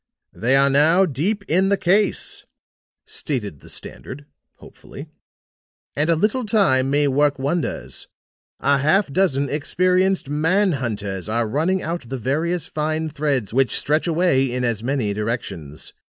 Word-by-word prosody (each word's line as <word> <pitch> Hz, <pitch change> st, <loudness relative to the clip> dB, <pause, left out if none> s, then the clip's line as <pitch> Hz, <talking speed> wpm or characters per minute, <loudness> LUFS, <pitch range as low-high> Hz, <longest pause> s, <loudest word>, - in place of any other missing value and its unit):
"They 125 Hz, +4 st, +1 dB
are 140 Hz, 0 st, +4 dB
now 160 Hz, +7 st, +5 dB
deep 185 Hz, -, -2 dB
in 185 Hz, +4 st, +2 dB
the 200 Hz, -, +3 dB
case," 195 Hz, +3 st, 0 dB, 0.6 s
stated 105 Hz, -, -4 dB
the -, -, -15 dB
Standard, 145 Hz, +2 st, -7 dB, 0.3 s
hopefully, -, -, -12 dB, 0.9 s
"and 150 Hz, +3 st, +1 dB
a 165 Hz, -, +4 dB
little 215 Hz, +9 st, 0 dB
time 185 Hz, -, +2 dB
may 145 Hz, +1 st, +2 dB
work 145 Hz, +1 st, +2 dB
wonders. 145 Hz, +5 st, -3 dB, 0.5 s
A 140 Hz, 0 st, +2 dB
half 155 Hz, +2 st, +2 dB
dozen 145 Hz, -7 st, +2 dB
experienced 185 Hz, +5 st, +1 dB
man 165 Hz, +7 st, +2 dB
hunters 105 Hz, -, -4 dB
are 115 Hz, +1 st, 0 dB
running 165 Hz, -, 0 dB
out 165 Hz, -7 st, -4 dB
the 135 Hz, -, -3 dB
various 155 Hz, +8 st, -1 dB
fine 155 Hz, +1 st, -2 dB
threads 140 Hz, -8 st, -2 dB
which 135 Hz, 0 st, +2 dB
stretch 155 Hz, +4 st, 0 dB
away 160 Hz, -6 st, +2 dB
in 125 Hz, 0 st, -2 dB
as 115 Hz, -3 st, -1 dB
many 125 Hz, -5 st, -1 dB
directions. 100 Hz, -, -5 dB
145 Hz, 140 wpm, -21 LUFS, 130-175 Hz, 0.9 s, now